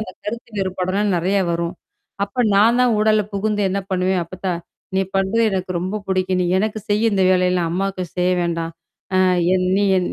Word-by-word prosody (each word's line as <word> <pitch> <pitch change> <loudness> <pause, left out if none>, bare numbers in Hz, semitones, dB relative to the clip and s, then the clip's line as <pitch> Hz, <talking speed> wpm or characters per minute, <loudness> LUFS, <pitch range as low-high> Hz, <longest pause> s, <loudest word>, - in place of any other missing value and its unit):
அந்தக் 185 -4 -8
கருத்து 230 +2 -6
வேறுபாடலாம் 190 +2 -1
நிறைய 185 +4 +1
வரும். 170 +1 -2 0.5
அப்ப 205 +5 -2
நான் 225 +4 +5
தான் 250 -1 +4
ஊடால 215 0 +3
புகுந்து 210 +1 -1
என்ன 195 +1 -1
பண்ணுவேன்? 185 0 +1
அப்பத்தா, 185 +2 -4 0.4
நீ 190 - +3 0.2
பண்றது 195 +4 +1
எனக்கு 185 -1 -3
ரொம்ப 190 +5 -3
புடிக்கும். 185 -1 0
நீ - - +1
எனக்குச் 215 +1 -2
செய், 210 +1 +2
இந்த 195 -1 +2
வேலையெல்லாம் 180 -2 +2
அம்மாவுக்குச் 185 -1 -3
செய்ய 180 +1 +2
வேண்டாம். 165 -1 -2 0.4
அ - - +4 0.4
என் 185 -1 +1
நீ 205 - +2
என் 180 -1 +1
190 Hz, 180 wpm, -20 LUFS, 180-205 Hz, 0.5 s, நான்